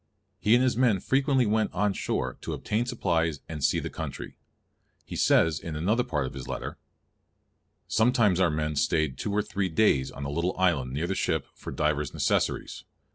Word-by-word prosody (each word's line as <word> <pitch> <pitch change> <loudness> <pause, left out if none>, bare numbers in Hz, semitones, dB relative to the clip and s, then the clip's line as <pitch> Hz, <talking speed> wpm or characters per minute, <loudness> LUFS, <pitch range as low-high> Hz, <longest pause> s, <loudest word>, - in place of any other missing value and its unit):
He 110 +3 +4
and 125 - +4
his 130 -3 +2
men 115 -5 +3
frequently 135 +1 +2
went 110 0 +1
on 100 +1 +1
shore 65 -8 -2
to - - -4
obtain 115 +3 -1
supplies 85 - 0
and 75 -3 -6
see - - +3
the - - -3
country. - - -6 0.7
He - - -7
says 80 -2 +3
in 80 -2 -6
another 105 +10 +1
part 75 - -1
of 65 - -6
his 65 - -7
letter—"Sometimes 110 -5 -2
our 90 -2 +4
men 75 0 -2
stayed 75 -1 +1
two 105 - -2
or 105 +1 +1
three 100 -2 -2
daies 80 -7 +2
on 70 - -7
a 70 - -3
little 85 +4 -1
island 80 -9 +1
neere 75 +5 -1
the 95 - -1
ship - - 0
for - - -8
divers 75 -1 -1
necessaries. - - 0
90 Hz, 185 wpm, -27 LUFS, 75-110 Hz, 0.7 s, He